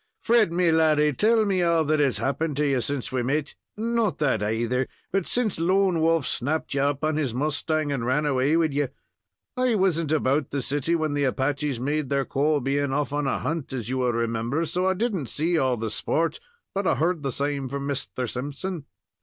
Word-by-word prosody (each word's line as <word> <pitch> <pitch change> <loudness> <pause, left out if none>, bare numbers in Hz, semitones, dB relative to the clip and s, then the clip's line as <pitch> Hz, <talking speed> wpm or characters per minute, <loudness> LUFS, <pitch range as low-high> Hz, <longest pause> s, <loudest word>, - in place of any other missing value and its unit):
"Fred, 230 -6 +4
me 175 -1 +2
laddy, 155 -2 +3
tell 220 - +3
me 190 -3 +1
all 170 -2 +3
that 155 +1 +1
has 135 -7 +2
happened 140 +6 -1
to 150 - +2
you 135 -3 +1
since 140 +2 -3
we 130 -1 0
met 145 +4 -1 0.2
not 230 -2 0
that, 135 -8 +1
aither, 115 +4 0 0.2
but 195 -2 0
since 235 -8 0
Lone 185 0 +2
Wolf 165 -3 +2
snapped 145 +6 -2
you 135 - +1
up 140 +1 0
on 155 0 +1
his 135 -7 -1
mustang, 150 +2 0
and 135 -4 -2
ran 130 +5 +1
away 140 +2 +2
wid 160 -3 +1
you. 145 0 +1 0.7
I 255 -2 +2
wasn't 170 -6 +1
about 145 -2 +1
the 140 -2 -2
city 145 +5 0
when 155 -3 -1
the 145 -1 +1
Apaches 135 0 -1
made 145 +2 -1
their 140 -1 +1
call, 145 +1 +1
being 140 +1 0
off 145 +1 -1
on 145 -1 0
a - - 0
hunt, 155 +1 -3
as 120 -4 -4
you 130 0 -1
will 125 -1 +1
remember, 115 +6 -1
so 180 +4 -1
I 190 - +2
didn't 195 - -1
see 165 +2 0
all 130 -3 +1
the 110 -1 -3
sport, 165 +8 0 0.3
but 200 -1 -1
I - - +3
heard 165 +4 0
the 135 -2 -2
same 140 0 -2
from 140 +1 -4
Misther 135 -2 -3
Simpson." 145 +7 -5
145 Hz, 210 wpm, -25 LUFS, 135-165 Hz, 0.7 s, Fred